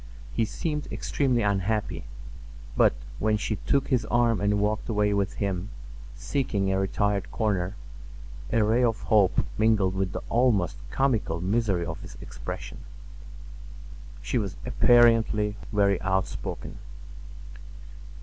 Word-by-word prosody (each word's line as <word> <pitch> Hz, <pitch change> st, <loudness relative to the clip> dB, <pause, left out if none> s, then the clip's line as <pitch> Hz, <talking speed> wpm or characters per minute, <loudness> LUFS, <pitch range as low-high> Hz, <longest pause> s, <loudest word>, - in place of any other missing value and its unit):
He 115 Hz, -, +1 dB
seemed 150 Hz, -, -3 dB
extremely 125 Hz, -5 st, 0 dB
unhappy; 100 Hz, +1 st, -1 dB, 0.7 s
but -, -, +4 dB, 0.2 s
when 110 Hz, 0 st, +2 dB
she 105 Hz, 0 st, -2 dB
took 140 Hz, +6 st, 0 dB
his 125 Hz, -5 st, +2 dB
arm 115 Hz, -1 st, +2 dB
and 100 Hz, 0 st, +2 dB
walked 105 Hz, +2 st, -1 dB
away 105 Hz, -2 st, +1 dB
with 100 Hz, -1 st, 0 dB
him, 100 Hz, -1 st, -2 dB, 0.5 s
seeking 105 Hz, -9 st, -1 dB
a 95 Hz, -, +1 dB
retired 100 Hz, +1 st, 0 dB
corner, 100 Hz, -3 st, -1 dB, 0.8 s
a 115 Hz, -, +3 dB
ray 115 Hz, +4 st, +3 dB
of 115 Hz, -3 st, +1 dB
hope 100 Hz, -4 st, +3 dB
mingled 105 Hz, -4 st, +3 dB
with 95 Hz, -2 st, -2 dB
the -, -, -5 dB
almost 115 Hz, -8 st, +2 dB
comical 110 Hz, -, 0 dB
misery 95 Hz, -1 st, 0 dB
of 80 Hz, -1 st, -6 dB
his -, -, -11 dB
expression. -, -, -7 dB, 1.4 s
She 125 Hz, -, 0 dB
was 100 Hz, -4 st, -3 dB
apparently 115 Hz, -3 st, +4 dB, 0.2 s
very 100 Hz, -3 st, +2 dB
outspoken. 95 Hz, 0 st, -3 dB
105 Hz, 120 wpm, -26 LUFS, 95-115 Hz, 1.4 s, but